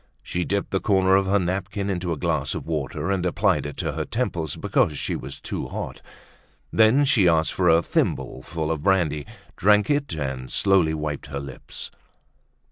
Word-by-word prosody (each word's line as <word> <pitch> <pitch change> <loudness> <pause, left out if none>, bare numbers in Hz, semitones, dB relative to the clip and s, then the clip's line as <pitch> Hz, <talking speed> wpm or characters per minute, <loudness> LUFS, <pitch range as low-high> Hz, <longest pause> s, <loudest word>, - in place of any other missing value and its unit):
She 90 - -2
dipped 100 0 -1
the 95 - +1
corner 95 -2 +3
of 95 0 +2
her 100 +2 +3
napkin 100 +2 -2
into 90 -3 -2
a 80 - -1
glass - - -1
of - - -5
water 75 +2 -2
and 95 -2 0
applied 90 -4 +1
it 75 - -8
to - - -1
her - - -3
temples 85 - -2
because 75 -2 +1
she - - -2
was 65 +1 -7
too - - -4
hot. - - -6 0.7
Then, 115 +6 +5
she 115 -10 +4
asked 80 -1 +3
for 90 -2 +2
a 80 +1 +5
thimbleful 80 +4 -1
of 80 -3 -2
brandy, 75 -6 +1 0.3
drank 105 +5 +4
it, 145 -1 0
and 65 -4 -4
slowly 95 -6 +3
wiped 75 -2 -4
her 70 -1 -4
lips. 70 -2 -7
85 Hz, 180 wpm, -24 LUFS, 75-100 Hz, 0.7 s, Then